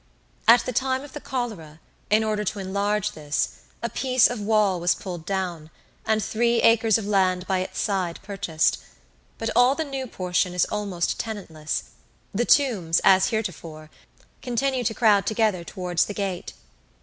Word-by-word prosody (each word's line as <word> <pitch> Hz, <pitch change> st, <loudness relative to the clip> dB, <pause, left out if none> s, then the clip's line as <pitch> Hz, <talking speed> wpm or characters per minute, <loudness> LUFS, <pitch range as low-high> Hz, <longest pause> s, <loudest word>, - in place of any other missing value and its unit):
At 235 Hz, +2 st, +7 dB
the 255 Hz, -, -3 dB
time 260 Hz, +2 st, 0 dB
of 290 Hz, -, -12 dB
the 295 Hz, -, -6 dB
cholera, 210 Hz, -, -5 dB, 0.3 s
in 215 Hz, +1 st, +4 dB
order 215 Hz, -1 st, -1 dB
to 210 Hz, -, -3 dB
enlarge 200 Hz, +2 st, -1 dB
this, 150 Hz, -1 st, -2 dB, 0.3 s
a 235 Hz, -, -1 dB
piece 255 Hz, -1 st, +3 dB
of 245 Hz, -3 st, -5 dB
wall 205 Hz, -3 st, +2 dB
was 175 Hz, +1 st, +2 dB
pulled 175 Hz, -3 st, -7 dB
down, 180 Hz, -5 st, -3 dB, 0.4 s
and 220 Hz, -1 st, +2 dB
three 235 Hz, +2 st, +1 dB
acres 225 Hz, -2 st, +5 dB
of 220 Hz, -, -5 dB
land 185 Hz, -3 st, +1 dB
by 190 Hz, -1 st, 0 dB
its 185 Hz, -, -4 dB
side 185 Hz, -5 st, -1 dB
purchased; 185 Hz, -, 0 dB, 0.6 s
but -, -, -2 dB
all 250 Hz, +3 st, +5 dB
the 320 Hz, -, -1 dB
new 270 Hz, -3 st, -5 dB
portion 180 Hz, -3 st, -1 dB
is 180 Hz, -, +3 dB
almost 200 Hz, -5 st, -2 dB
tenantless; 165 Hz, -9 st, -4 dB, 0.5 s
the 235 Hz, +4 st, 0 dB
tombs, 210 Hz, -, +3 dB
as 190 Hz, 0 st, +5 dB
heretofore, 165 Hz, -7 st, -5 dB, 0.5 s
continue 255 Hz, +1 st, -1 dB
to 220 Hz, -, +1 dB
crowd 205 Hz, -4 st, +3 dB
together 215 Hz, -5 st, +1 dB
towards 180 Hz, 0 st, -1 dB
the 205 Hz, -, -7 dB
gate. 195 Hz, -3 st, -4 dB
205 Hz, 160 wpm, -24 LUFS, 180-230 Hz, 0.6 s, At